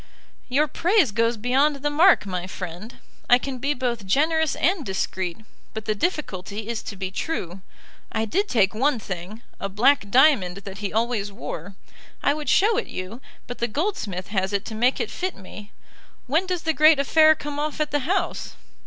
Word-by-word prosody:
"Your 290 +4 +2
praise 345 - +2
goes 230 +2 +1
beyond 265 +6 +2
the 290 +1 -2
mark, 330 - +5
my 185 -2 -4
friend. 185 +4 -7 0.3
I 245 - +8
can 260 0 -5
be 285 +3 0
both 235 -5 -3
generous 315 - +2
and 355 0 +1
discreet; 190 -1 -3 0.3
but 220 0 -5
the 215 - +1
difficulty 210 - -3
is 235 -2 -2
to 205 - -7
be 190 -1 -4
true. 190 - -4 0.5
I 220 - -1
did 390 - 0
take 200 -6 +3
one 265 +5 +1
thing, 195 +2 -7 0.2
a 195 - -3
black 210 +2 +3
diamond 240 - +4
that 195 -1 -8
he 205 -2 -3
always 220 -2 -1
wore. 195 -1 -7 0.5
I 285 - +3
would 300 0 -4
show 425 +2 +4
it 475 - -1
you, 190 +7 -7 0.2
but 245 - -8
the 235 - 0
goldsmith 215 - -3
has 190 -1 -1
it 200 - -1
to 225 - -6
make 245 +4 +1
it 455 - -2
fit 370 +1 -3
me. 205 +2 -11 0.5
When 320 +9 +1
does 360 -3 -2
the 320 - +1
great 310 0 +6
affair 310 +3 +5
come 290 0 -6
off 300 0 -3
at 305 -1 -1
the 290 - +1
House?" 350 +9 -2
245 Hz, 190 wpm, -24 LUFS, 200-300 Hz, 0.5 s, I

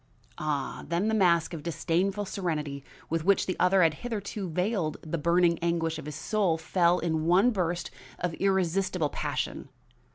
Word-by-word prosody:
Ah! 150 -3 -2
then 175 +6 0
the - - 0
mask 175 -6 +3
of 160 - -5
disdainful 180 +5 -1
serenity 150 -8 -3 0.2
with 165 -1 -1
which 200 +2 +3
the 185 - -2
other 180 0 +4
had 165 -1 +4
hitherto 205 -1 -5
veiled 180 -1 -1
the 160 +1 -3
burning 170 +1 +3
anguish 165 -1 -1
of 150 - -8
his 150 - -5
soul 195 -2 0
fell 170 +2 +2
in 160 -2 -1
one 195 +8 +5
burst 175 -4 -2 0.3
of 180 -2 -2
irresistible 190 -3 +1
passion. - - -3
170 Hz, 160 wpm, -28 LUFS, 160-190 Hz, 0.3 s, one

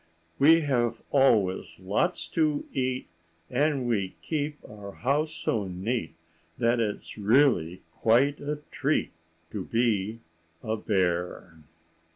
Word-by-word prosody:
We 160 +4 +7
have 120 -5 0
always 110 -12 +2
lots 100 - 0
to 155 -3 +1
eat, 130 -2 -2 0.4
And 140 -1 +1
we 100 -6 -1
keep 150 -1 -2
our 100 -2 -10
house 145 +5 0
so 110 -10 -1
neat 90 -1 -3 0.4
That 120 +1 +2
it's 110 -1 -3
really 105 - +3
quite 130 +6 +3
a 150 +1 -4
treat 145 +2 0 0.4
To 100 -3 -4
be 115 -1 0 0.4
a 110 0 -1
bear. 90 -4 -1
120 Hz, 115 wpm, -27 LUFS, 100-145 Hz, 0.4 s, We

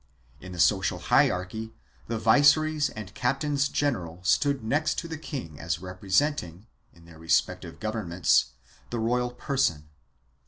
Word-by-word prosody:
2 95 - -11
In - - -8
the 90 - -8
social 95 +3 +3
hierarchy 110 +5 +1 0.3
the 115 - -2
viceroys 145 +6 +4
and 105 -2 -9
captains 140 +4 0
general 90 - -2
stood 140 +6 +2
next 150 +7 0
to 170 - -3
the 165 - -5
king 130 - -7
as 85 -1 -2
representing, 95 - -1 0.3
in 85 0 -20
their 85 -1 -15
respective 80 0 0
governments, 95 -6 +1 0.4
the 120 - -3
royal 125 +2 0
person. 125 - -1
110 Hz, 135 wpm, -27 LUFS, 90-140 Hz, 0.4 s, viceroys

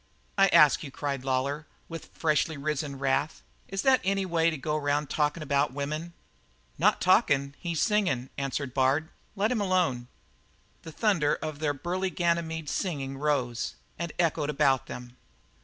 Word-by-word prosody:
'" - - -38
"I 195 - +7
ask 150 -6 +6
you," 150 - -6
cried 140 -1 -3
Lawlor, 135 +3 -1 0.2
with 165 -1 -8
freshly 155 0 0
risen 145 -1 -3
wrath, 135 +3 -1 0.2
"is 195 0 -3
that 265 -1 +5
any 195 0 +1
way 165 -2 +2
to 160 - -3
go 150 +3 -2
around 145 -1 0
talkin' 150 +1 0
about 140 -2 +1
women?" 155 +4 -4 0.7
"Not - - +4
talking. 140 0 +3
He's 170 -2 -2
singing," 185 - +1
answered 140 -1 -3
Bard. 135 +4 +2 0.3
"Let 210 +4 +1
him 235 -4 0
alone." 180 -11 +1 0.7
The 160 - -9
thunder 170 -6 +2
of 155 -2 -6
their 145 -2 0
burly 180 +6 -2
Ganymede's 170 -3 -1
singing 135 -7 -3
rose 130 -5 -1 0.2
and 170 -1 -3
echoed 160 -3 +1
about 135 -3 +2
them. 125 0 -9
150 Hz, 155 wpm, -28 LUFS, 140-170 Hz, 0.7 s, I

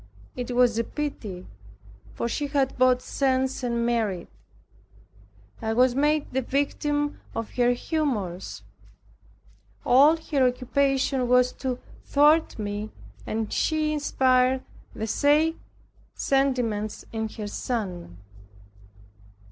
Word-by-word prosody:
It 245 0 -4
was 240 -2 +4
a - - +2
pity, 220 -10 -5 0.7
for - - -3
she 290 +5 -2
had 275 -2 0
both 255 0 +3
sense 265 -1 0
and 235 -2 -1
merit. 220 -7 -1 1.3
I 220 - -1
was 250 +2 +4
made 295 +2 +1
the 265 - +1
victim 290 +2 -1
of 225 -1 -4
her 245 0 +2
humors. 240 - -3 1.2
All 285 +6 +6
her 290 -5 +1
occupation 265 +1 0
was 250 0 +4
to 255 -2 -1 0.3
thwart 300 +3 +3
me 205 0 -4 0.4
and 220 -1 -2
she 310 -1 +1
inspired 260 -3 +2 0.3
the 220 0 -3
like 315 +3 +4 0.6
sentiments 245 -6 0
in 220 -1 -2
her 215 - -4
son. 195 - -4
255 Hz, 110 wpm, -25 LUFS, 225-280 Hz, 1.3 s, All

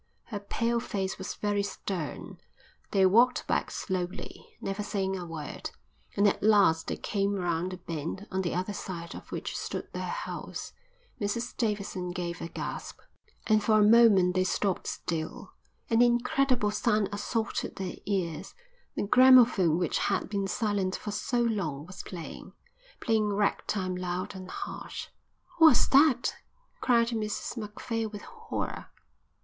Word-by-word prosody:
Her 210 -4 -5
pale 230 +3 0
face 195 -5 -3
was 190 - -5
very 205 -1 0
stern. 190 -5 -5 0.5
They 195 -1 +4
walked 235 +7 +4
back - - 0
slowly, 185 -1 -5
never 195 +1 -3
saying 195 -2 -1
a 180 -2 -5
word, 160 -3 -6 0.5
and 200 +1 +5
at 200 - +1
last 200 -6 +4
they - - -2
came 200 0 -1
round 175 -1 -1
the - - -6
bend 170 +3 -5
on 190 - 0
the 175 -3 -2
other 185 +3 -2
side 170 -4 -6
of - - -11
which - - -4
stood - - -4
their - - -3
house. - - -5 0.5
Mrs 230 +4 -2
Davidson 200 -5 -2
gave 175 -2 -4
a - - -3
gasp, - - -6 0.5
and 215 -1 +3
for 215 0 +4
a - - +6
moment 210 -6 +6
they 185 0 +2
stopped 190 0 0
still. 160 -1 -4 0.3
An 230 0 +3
incredible 245 -1 +3
sound 210 -2 +2
assaulted 220 +2 -2
their 190 -2 -5
ears. 180 -6 -2 0.4
The - - -1
gramophone 240 -7 +6
which 175 -3 0
had - - 0
been 200 -1 -1
silent 200 -2 0
for 210 - -5
so 240 +4 0
long 170 -11 -1
was 185 +2 -8
playing, 170 -4 -8 0.5
playing 215 -2 +2
ragtime 200 -2 0
loud 180 +1 -3
and 185 -1 -9
harsh. - - -6 0.5
"What's 315 -7 +7
that?" 275 -3 +4 0.4
cried 235 -2 +3
Mrs 215 -2 -3
Macphail 225 0 -3
with 205 -1 -8
horror. 450 -1 -5
200 Hz, 145 wpm, -29 LUFS, 185-225 Hz, 0.5 s, What's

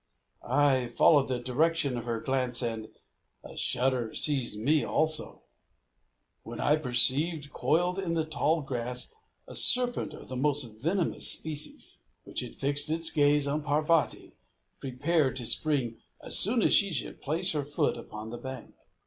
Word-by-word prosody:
I 130 -1 +1
followed 140 +4 +3
the 130 - -2
direction 140 +3 0
of 120 -1 -6
her 115 -1 -3
glance, 130 -2 -2
and 115 -2 -5 0.5
a - - -12
shudder 125 -3 -1
seized 130 -8 +1
me 145 +7 +1
also, 155 0 0 1.0
when - - -10
I 150 - +2
perceived, 145 +3 +2
coiled 175 +6 -1
in 170 -3 -3
the 160 -1 -1
tall 155 +1 -1
grass, 125 -2 -5 0.3
a - - -11
serpent 250 -1 +3
of - - -13
the 130 - -7
most 145 +2 +3 0.2
venomous 170 +4 0
species, 155 -2 +1 0.2
which - - -5
had - - -6
fixed 145 +2 +2
its 165 +1 +2
gaze 145 -1 +2
on 145 +2 -2
Parvati, 150 +2 -1 0.5
prepared 140 +2 -1
to 125 - -4
spring 130 -3 +1 0.2
as - - -4
soon 225 +3 +3
as - - +3
she 200 -2 +5
should 140 -7 -3
place 165 +6 -1
foot 145 -1 -2
upon 110 -2 -10
the 120 - -8
bank. 130 0 -9
145 Hz, 150 wpm, -28 LUFS, 125-160 Hz, 1.0 s, she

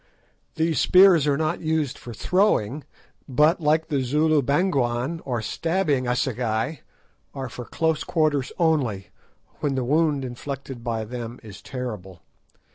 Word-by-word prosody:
These 160 -1 +1
spears 180 -5 +6
are 140 -1 +2
not 160 +3 -1
used 155 -4 0
for 120 - -10
throwing 145 - +1 0.4
but 150 +7 +3
like 155 +1 +2
the 140 -3 0
Zulu 150 +4 +2
"bangwan," 140 -1 0
or 120 -4 -2
stabbing 165 - 0
assegai, 125 +1 -1 0.6
are 135 -2 -4
for 125 +1 -8
close 160 +3 0
quarters 155 -6 0
only, 125 - 0 0.5
when 140 -2 -1
the 130 - -1
wound 150 0 +1
inflicted 130 0 -7
by 115 -2 -2
them 120 +1 -7
is 105 -3 -11
terrible. 105 - -7
140 Hz, 130 wpm, -24 LUFS, 120-160 Hz, 0.6 s, spears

